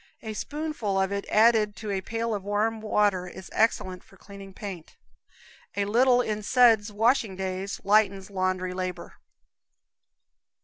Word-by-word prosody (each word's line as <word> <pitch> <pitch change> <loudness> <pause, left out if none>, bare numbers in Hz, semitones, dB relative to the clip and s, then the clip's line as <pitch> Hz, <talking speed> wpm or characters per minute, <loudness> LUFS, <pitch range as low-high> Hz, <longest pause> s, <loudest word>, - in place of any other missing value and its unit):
A 220 -1 -5
spoonful 290 -7 -3
of 190 0 0
it 200 0 -3
added 215 -1 +4
to 215 -2 -6
a 195 -1 -1
pail 230 +3 -3
of 205 - -3
warm 215 +2 -1
water 205 -4 +1
is 185 +1 -11
excellent 185 -5 0
for - - -21
cleaning 200 -1 -12
paint. 190 -4 -9 0.8
A 200 0 0
little 245 +4 +4
in 215 -3 -3
suds 225 -2 +4
washing 225 -1 +1
days 190 +1 -4
lightens 200 -1 +2
laundry 185 -1 -1
labor. 180 -1 -5
205 Hz, 140 wpm, -26 LUFS, 190-225 Hz, 0.8 s, added